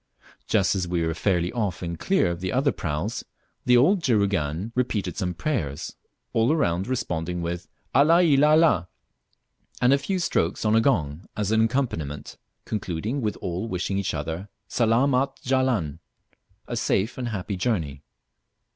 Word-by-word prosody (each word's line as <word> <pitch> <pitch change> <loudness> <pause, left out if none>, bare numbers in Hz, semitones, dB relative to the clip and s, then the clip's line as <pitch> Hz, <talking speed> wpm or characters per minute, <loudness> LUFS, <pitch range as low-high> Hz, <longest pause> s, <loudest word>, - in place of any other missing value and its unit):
Just 95 - +2
as 90 -2 -1
we 85 -1 0
were 80 - 0
fairly 90 0 0
off 105 -7 -2
and 85 -1 -4
clear 190 - +2
of 85 - -4
the 95 - -2
other 135 +2 +2
praus, 85 +9 -3 0.4
the 125 0 +6
old 175 +10 +4
juragan 100 - 0
repeated 110 -7 -1
some 90 -4 -2
prayers, 85 - -3 0.4
all 115 +4 +3
around 95 - +1
responding 90 -9 -2
with 85 +1 -4 0.3
"Allah 165 +6 +5
il 145 -4 +4
Allah," 155 - +4 0.9
and 125 +2 +4
a 140 - +3
few 190 +7 -2
strokes 100 - 0
on 105 +1 +3
a 115 - +5
gong 85 - 0
as 105 -1 -1
an 110 0 +4
accompaniment, 80 - -3 0.3
concluding 105 - -3
with 105 -3 -1
all 90 +5 -3
wishing 95 0 -2
each 100 - -2
other 80 +7 -4 0.2
"Salaamat 125 +5 +2
jalan," 125 - 0 0.7
a 120 - -3
safe 110 -1 0
and 125 - -2
happy 100 -3 -3
journey. 85 - -1
105 Hz, 155 wpm, -25 LUFS, 85-125 Hz, 0.9 s, the